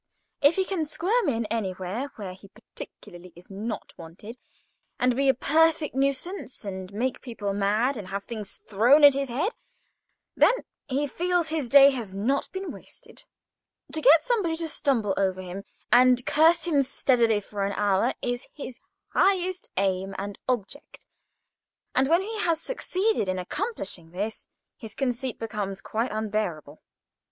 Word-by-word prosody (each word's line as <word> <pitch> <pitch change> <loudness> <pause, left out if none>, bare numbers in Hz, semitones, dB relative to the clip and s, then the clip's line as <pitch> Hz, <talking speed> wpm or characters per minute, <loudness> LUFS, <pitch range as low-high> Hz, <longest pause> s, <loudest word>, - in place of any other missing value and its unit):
If 285 +4 +5
he 380 - +1
can 370 -4 -1
squirm 380 +8 0
in 230 -3 -1
anywhere 200 +4 -3
where 195 -4 -6
he 190 +2 -15
particularly 180 -2 -11
is 175 +3 -15
not 215 +3 -5
wanted, 175 +8 -10 0.6
and 250 -1 +2
be 275 +1 +2
a - - +6
perfect 315 +3 +2
nuisance, 275 - -2
and 190 -1 -6
make 240 +5 -2
people 215 -5 -4
mad, 210 +7 +1
and 200 -3 -7
have 200 +1 -4
things 215 -4 -6
thrown 240 +9 +5
at 285 -1 +10
his 275 -1 -2
head, 300 - 0 0.8
then - - +5 0.3
he 280 +1 0
feels 350 +3 0
his 310 -6 -2
day 280 +1 +8
has 225 -8 -5
not 250 +8 0
been 380 0 -5
wasted. - - -12 0.7
To 315 - +1
get 305 +3 +7
somebody 425 -10 0
to 330 0 -3
stumble 255 -10 +1
over 190 -1 +1
him, 185 +2 -7 0.3
and 250 0 +5
curse 325 +2 +4
him 305 -5 +3
steadily 235 -4 +2
for 205 0 -5
an 200 0 -1
hour, 205 +4 +1
is 245 0 -2
his 260 -4 -8 0.3
highest 370 -1 +1
aim 190 0 0
and 200 +1 -6
object; 250 +3 -4 0.9
and, 265 +1 +3
when 340 +3 +4
he 435 +1 -5
has 335 -4 +1
succeeded 405 - -1
in 185 - -1
accomplishing 185 - -4
this, 205 +6 -4 0.3
his 220 -1 -9
conceit 255 -1 -2
becomes 205 -3 -4
quite 230 +3 -2
unbearable. 210 -9 -3
245 Hz, 155 wpm, -26 LUFS, 200-305 Hz, 0.9 s, at